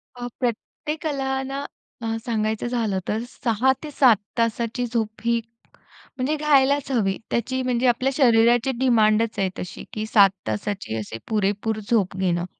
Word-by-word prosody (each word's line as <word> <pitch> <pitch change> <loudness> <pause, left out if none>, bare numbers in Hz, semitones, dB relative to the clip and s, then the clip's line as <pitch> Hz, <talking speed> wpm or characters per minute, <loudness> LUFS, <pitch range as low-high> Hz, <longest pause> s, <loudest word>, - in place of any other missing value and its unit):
अ, 245 0 -5
प्रत्येकाला 270 +2 -2
ना 275 +1 -4 0.4
अ, - - -5 0.2
सांगायचं 220 0 -1
झालं, 225 -6 -1
तर 220 +2 -1
6-7 260 +1 +2 0.2
तासाची 230 +1 0
झोप 225 -2 -3
ही, 235 0 +3 0.8
म्हणजे 270 +5 0
घ्यायलाच 285 -2 +3
हवी 195 -6 +1
त्याची, 260 +3 -1
म्हणजे 250 0 +1
आपल्या 255 +3 +2
शरीराची 240 0 +4
डिमांडच 225 -3 +3
आहे 190 -1 +1
तशी, 180 - -7
की 215 0 -3
7 200 -3 +6 0.2
तासाची, 110 - -3
असे 110 +1 -5
पुरेपूर 210 +1 0
झोप 200 -5 +2
घेणं. 175 -2 0
235 Hz, 135 wpm, -23 LUFS, 215-260 Hz, 0.8 s, 7